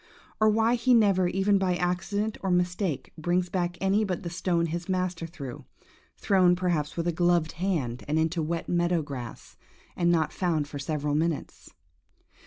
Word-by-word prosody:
or 215 0 +5
why 225 +2 +3
he 245 +1 +3
never, 195 -5 +4
even 195 +2 +2
by 185 -1 +1
any - - -5
accident 195 +4 -1
or 195 - -2
mistake, 180 -2 -1
brings 175 +2 0
back 175 -1 -2
any 195 +3 +2
but 185 -4 -3
the 170 - -5
stone 175 -1 0
his 170 +2 -4
master 185 -3 -1
threw–thrown, 175 +5 -1
perhaps, 175 -5 -1
with 170 0 -1
a - - +2
gloved 175 -1 +2
hand, 160 -10 -2
and 150 +2 0
into 160 +1 +1
wet 165 +2 -3
meadow 175 -1 +1
grass, 130 -5 -8 0.4
and 170 -1 +2
not 160 -3 +1
found 160 -5 0
for 145 -1 -7
several 145 0 -2
minutes? 160 +1 -2
175 Hz, 170 wpm, -27 LUFS, 160-185 Hz, 0.4 s, or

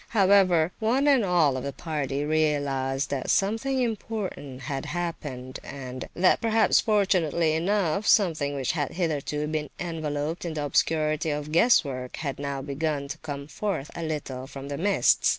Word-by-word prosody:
However, 185 -4 +5
one 250 +6 +2
and 270 -5 +5
all 170 -8 +3
of 130 - -4
the 140 - -3
party 145 -2 -3
realized 145 -3 0
that 135 -2 -2
something 225 +7 +1
important 205 - -4
had 135 0 -4
happened, 145 -7 -5
and 130 -2 -7
that, 185 +1 +3
perhaps 225 -1 +4
fortunately 175 -7 +2
enough, 190 +2 0
something 155 -8 +3
which 135 -3 0
had 145 -5 -2
hitherto 150 -4 -1
been 150 -1 -3
enveloped 155 -2 -3
in 165 -3 -4
the 150 -1 -2
obscurity 155 +2 +1
of 150 0 -3
guess 175 +10 +5
work 130 -2 -5
had 140 -5 -4
now 140 -1 -3
begun 140 0 -2
to 155 +3 -6
come 145 -2 -6
forth 155 -2 -3
a 170 - -6
little 140 -5 -4
from 140 0 -8
the 140 - -3
mists. 200 +3 +3
155 Hz, 160 wpm, -26 LUFS, 140-180 Hz, -, However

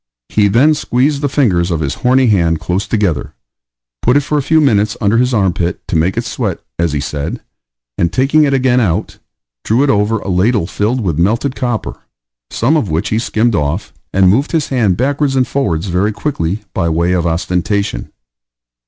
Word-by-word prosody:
He 105 -1 +2
then 125 +10 +4
squeezed 140 0 0
the 145 - 0
fingers 95 -12 +1
of 85 -3 -1
his 70 -3 -2
horny 130 +1 +3
hand 85 -8 +2
close 95 +3 -2
together, 100 -7 -1 0.7
put 125 +4 +3
it - - +3
for 150 +2 -3
a - - 0
few 160 +3 +2
minutes 105 -8 +2
under 110 +1 +2
his 125 +1 +2
armpit, 90 -6 -1
to - - -3
make 85 +6 +1
it 115 - -1
sweat, 110 -6 -3 0.2
as 85 -3 0
he 75 - -1
said; 75 +2 -4 0.6
and, 85 -1 +1
taking 140 +7 +3
it 145 - +2
again 130 -2 +2
out, 95 -9 -1 0.4
drew 120 +5 +2
it 145 - +3
over 105 +1 +1
a 100 - -8
ladle 100 +2 +1
filled 110 +7 -1
with 85 -7 -1
melted 115 +9 +1
copper, 120 -4 -3 0.5
some 130 +8 +1
of 115 - -1
which 85 +7 -1
he 110 - 0
skimmed 115 0 0
off, 80 +2 -2 0.2
and 95 0 +3
moved 135 - 0
his 160 -3 0
hand 110 -9 +1
backwards 140 +2 0
and 130 -2 +2
forwards, 100 - -1
very 95 +3 0
quickly, 105 - -3
by 85 - 0
way 85 +2 +1
of 90 -2 +1
ostentation. 90 - -2
105 Hz, 190 wpm, -15 LUFS, 90-130 Hz, 0.7 s, then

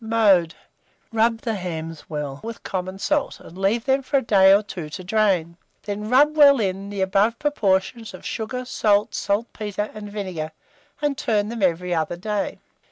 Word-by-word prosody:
Mode. 205 -7 +3 0.6
Rub 225 0 +2
the 230 - -2
hams 165 -4 -6
well 145 -3 -4
with 230 +1 -7
common 185 0 -4
salt, 295 +8 -1
and 170 - -13
leave 200 +5 0
them 265 0 +2
for 275 +2 0
a - - +2
day 195 -4 +6
or 200 +2 +5
two 175 -6 -7
to 185 +5 -7
drain; 180 -4 +1 0.3
then 210 +1 -4
rub 290 +5 +5
well 285 -3 +7
in, 195 -1 -2
the 200 -1 -4
above 200 +4 +2
proportion 220 -6 0
of 185 - -12
sugar, 250 +3 -4
salt, 210 -4 +1
saltpetre, 210 0 -2
and 210 -1 -8
vinegar, 185 -7 -4 0.5
and 290 -1 0
turn 210 -6 0
them 235 -1 -5
every 180 -1 +1
other 165 +1 -1
day. 210 +2 -2
205 Hz, 170 wpm, -23 LUFS, 185-230 Hz, 0.6 s, well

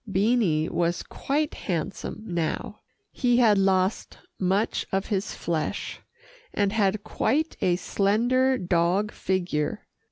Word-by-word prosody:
Beanie 195 -6 +2
was 170 0 0
quite 295 +2 -2
handsome 185 +4 -4
now. 175 +4 -3 0.3
He 245 -1 +2
had 220 -5 +5
lost 190 +1 +1 0.2
much 195 +3 +1
of 195 0 0
his 200 0 -1
flesh, 165 -3 -3 0.6
and 200 -1 +1
had 205 -2 +1
quite 310 +7 0
a 175 - +3
slender 240 +8 +2
dog 180 +3 +1
figure. 175 -5 -2
195 Hz, 115 wpm, -26 LUFS, 175-225 Hz, 0.6 s, had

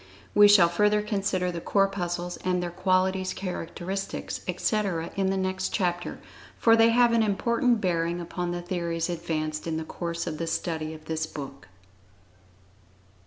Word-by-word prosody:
We 205 0 +8
shall 205 -4 +7
further 210 +4 +2
consider 195 -4 -1
the 170 -1 -5
Corpuscles, 180 -3 0
and 180 -1 -1
their 175 - -3
qualities, 185 +1 +1
characteristics, 185 +1 -4
etc., 195 -7 -1
in 195 -1 +1
the 195 - 0
next 190 0 -1
chapter, 175 -3 -1 0.4
for 225 -1 +5
they 225 0 +6
have 240 0 +4
an 230 - +4
important 235 +2 +1
bearing 170 -1 0
upon 175 +1 -4
the 175 0 -3
theories 170 -1 -2
advanced 155 -2 -3
in 160 -1 -1
the 160 - -3
course 170 +1 -4
of 155 -2 -4
the 165 - -2
study 160 -1 -2
of 155 0 -14
this 160 0 -2
book. 135 - -8
180 Hz, 155 wpm, -27 LUFS, 170-195 Hz, 0.4 s, We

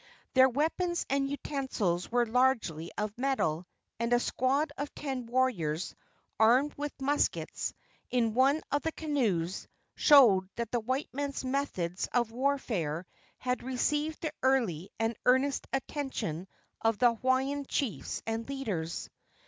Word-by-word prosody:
Their 260 0 +7
weapons 330 +6 0
and 275 0 +1
utensils 260 - -2
were 240 0 +3
largely 225 -10 +1
of 210 0 -2
metal, 185 - 0 0.3
and 235 0 -1
a 240 - +5
squad 275 +5 +1
of 290 +1 -4
ten 265 -4 -4
warriors 200 -11 0 0.5
armed 250 +7 +5
with 290 0 -5
muskets, 285 +2 0 0.3
in 230 -3 +1
one 270 +5 +3
of 290 - +1
the 320 - -1
canoes, 220 - -1 0.3
showed 220 - +6
that 235 -1 -3
the 240 - +1
white 260 +6 -2
man's 280 -1 -3
methods 225 -10 -2
of 240 -2 +2
warfare 225 - -1 0.3
had 250 0 -1
received 295 +5 -1
the 310 -3 -3
early 220 -10 +1
and 225 +1 0
earnest 260 +2 +3
attention 265 - -3 0.3
of 225 -1 +2
the 240 0 +5
Hawaiian 265 +4 0
chiefs 270 -7 -2
and 225 +2 -3
leaders. 205 -12 -3
255 Hz, 130 wpm, -30 LUFS, 220-280 Hz, 0.5 s, Their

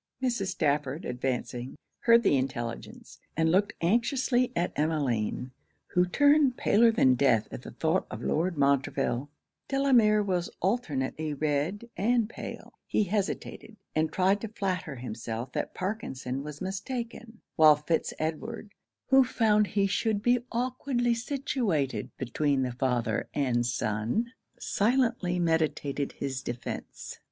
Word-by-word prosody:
Mrs. 240 -7 -1
Stafford 150 -3 -1
advancing, 125 0 -3 0.2
heard 235 0 +5
the 170 - +4
intelligence, 130 -3 -4 0.2
and 160 0 +3
looked 195 +3 +2
anxiously 245 - +2
at 175 +1 0
Emmeline, 130 -6 -1 0.4
who 180 0 +2
turned 285 +4 +4
paler 230 +2 +4
than 135 - +4
death 125 -4 +3
at - - -6
the - - -9
thoughts 165 +4 0
of - - -7
Lord 170 +2 0
Montreville. 140 -1 +1 0.4
Delamere 245 -7 +4
was 180 -3 -1
alternately 155 - -1
red 155 +9 -1
and 230 +3 +2
pale. 235 - -8
He - - +2
hesitated, 205 +2 -3 0.2
and 155 0 +1
tried 195 +3 +2
to 225 - -3
flatter 185 -7 -3
himself 115 0 -5
that - - -3
Parkinson 140 - -3
was 150 0 -8
mistaken; 225 +4 -5 0.2
while 155 -1 +7
Fitz 150 +3 -1
Edward, 205 +8 -4 0.4
who 270 0 +7
found 215 -4 +2
he 200 0 +1
should 205 +1 0
be 245 +1 +4
awkwardly 245 0 0
situated 230 - -1
between 135 +1 0
the 125 - -2
father 125 -1 -1
and 120 -4 +1
son, 120 - -1 0.2
silently 230 -5 +1
meditated 155 -4 0
his 135 -2 -4
defence. 120 0 -6
175 Hz, 125 wpm, -28 LUFS, 135-225 Hz, 0.4 s, while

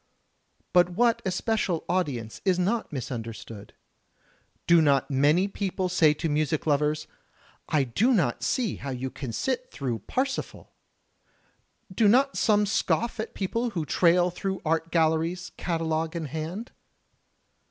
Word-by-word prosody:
But 180 -1 +5
what 230 +6 +2
especial 190 -2 -1
audience 135 -12 -2
is 185 -3 +2
not 205 +6 0
misunderstood? 115 -5 -7 0.9
Do 170 -1 +6
not 140 -1 +2
many 150 +8 +3
people 190 -2 -2
say 165 -4 +4
to 165 - -2
music 155 0 0
lovers, 150 0 +1 0.6
"I 150 -3 +3
don't 170 - +1
see 240 -7 -1
how 140 - -6
you 130 0 -4
can 130 -5 -6
sit 255 - -2
through 125 -5 -3
Parsifal"? 265 +1 -3 1.2
Do 215 +3 +3
not 270 +6 +4
some 210 -2 +3
scoff 230 +3 0
at 220 - -5
people 230 +5 -1
who 160 - -1
trail 175 +3 +3
through 190 +2 -3
art 165 +1 0
galleries, 165 +2 +1
catalogue 165 -1 -2
in 165 -2 -3
hand? 160 - -5
170 Hz, 130 wpm, -26 LUFS, 150-200 Hz, 1.2 s, Do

